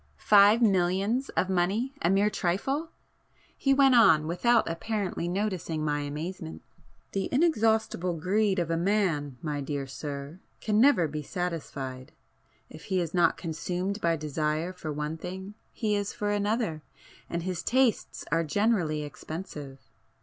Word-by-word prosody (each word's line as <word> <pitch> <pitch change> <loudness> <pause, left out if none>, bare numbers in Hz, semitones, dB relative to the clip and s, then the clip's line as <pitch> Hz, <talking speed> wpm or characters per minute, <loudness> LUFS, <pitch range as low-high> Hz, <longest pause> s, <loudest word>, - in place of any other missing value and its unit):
Five 210 +3 +6
millions 195 +5 +2
of 185 - +2
money 190 +8 0
a - - +2
mere 200 +2 +3
trifle! 270 - -1 0.7
He 275 - +1
went 270 -1 +5
on 160 -11 +6
without 230 +9 +2
apparently 185 +1 -2
noticing 180 -5 -2
my 145 -1 0
amazement— 145 - -6 0.5
"The 195 -1 -2
inexhaustible 220 - +1
greed 195 +4 +1
of 170 -2 -1
a 165 - +1
man, 170 -8 0
my 150 -2 -2
dear 140 0 -3
sir, 140 +3 -7 0.2
can 215 0 +2
never 255 - +5
be 150 +1 -5
satisfied. 145 -7 -5 0.5
If - - -12
he 190 - 0
is 170 -2 -3
not 175 -2 +3
consumed 180 +4 -3
by 165 -1 +2
desire 155 +3 -2
for 165 -4 -6
one 150 +2 -3
thing, 190 +4 -7 0.2
he 210 -2 -1
is 205 0 -2
for 205 0 -2
another, 205 -5 -1 0.5
and 170 0 -3
his 180 -2 -3
tastes 255 -3 +1
are 165 +2 +2
generally 165 -3 +1
expensive. 150 -2 -8
180 Hz, 140 wpm, -28 LUFS, 155-210 Hz, 0.7 s, Five